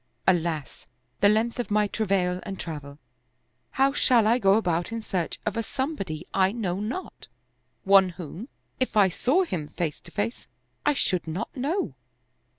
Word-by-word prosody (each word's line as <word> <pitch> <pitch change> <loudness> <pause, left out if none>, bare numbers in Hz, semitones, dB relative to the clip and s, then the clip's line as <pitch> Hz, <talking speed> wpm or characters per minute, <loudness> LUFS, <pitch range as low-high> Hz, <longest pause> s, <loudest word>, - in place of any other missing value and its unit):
Alas, 170 -5 0 0.3
the 205 - +6
length 225 +3 +1
of 245 - -2
my 210 0 +3
travail 195 -4 0
and 195 -2 -6
travel 145 -4 -6
I 125 -2 -31
How 270 +1 +4
shall 245 -6 +4
I 235 +3 +4
go 195 -3 +5
about 175 -3 0
in 230 - -2
search 185 -6 -3
of - - -1
a 230 - 0
somebody 245 - -3
I 190 0 +3
know 195 -5 -2
not, 230 - -5 0.6
one 195 -1 +6
whom, 180 - -8 0.3
if 255 -4 0
I 200 -2 +6
saw 275 - +2
him 170 - -3
face 160 -2 -3
to - - -14
face 215 +3 -3 0.4
I 295 - +4
should 180 -9 0
not 175 +8 -4
know 285 - -1
195 Hz, 165 wpm, -26 LUFS, 170-230 Hz, 0.6 s, the